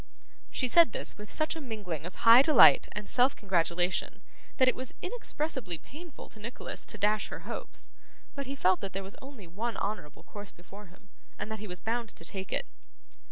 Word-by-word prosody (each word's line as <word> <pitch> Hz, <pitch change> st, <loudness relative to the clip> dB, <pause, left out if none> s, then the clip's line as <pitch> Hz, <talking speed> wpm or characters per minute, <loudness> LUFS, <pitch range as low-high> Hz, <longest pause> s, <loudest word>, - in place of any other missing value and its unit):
She 255 Hz, -, 0 dB
said 330 Hz, -1 st, +6 dB
this -, -, -4 dB
with 210 Hz, +1 st, -10 dB
such 310 Hz, +1 st, 0 dB
a 320 Hz, -, -6 dB
mingling 200 Hz, -, -5 dB
of 180 Hz, -, -10 dB
high 230 Hz, +2 st, +8 dB
delight 300 Hz, +1 st, +7 dB
and 210 Hz, -1 st, -5 dB
self 255 Hz, +2 st, +3 dB
congratulation, 175 Hz, -2 st, 0 dB, 0.3 s
that 260 Hz, -, +5 dB
it 255 Hz, -, +4 dB
was 255 Hz, 0 st, -4 dB
inexpressibly 305 Hz, -, -2 dB
painful 310 Hz, -, -11 dB
to 220 Hz, -, -7 dB
Nicholas 230 Hz, +4 st, -5 dB
to 215 Hz, -, -6 dB
dash 210 Hz, +1 st, +1 dB
her -, -, -7 dB
hopes; -, -, -8 dB, 0.4 s
but 280 Hz, -1 st, -5 dB
he 275 Hz, -, -4 dB
felt 185 Hz, -8 st, +2 dB
that 195 Hz, -, -5 dB
there 195 Hz, +1 st, -3 dB
was 195 Hz, +2 st, -8 dB
only 265 Hz, -7 st, -11 dB
one 210 Hz, +6 st, -4 dB
honourable 200 Hz, -8 st, -4 dB
course 205 Hz, -1 st, -9 dB
before 195 Hz, +4 st, -13 dB
him, 185 Hz, +3 st, -21 dB, 0.3 s
and 215 Hz, -, -5 dB
that 220 Hz, -, -4 dB
he 215 Hz, -, -7 dB
was 180 Hz, -1 st, -6 dB
bound 230 Hz, +1 st, -2 dB
to 165 Hz, -, -9 dB
take 190 Hz, +2 st, -5 dB
it. -, -, 0 dB
215 Hz, 200 wpm, -30 LUFS, 190-260 Hz, 0.4 s, high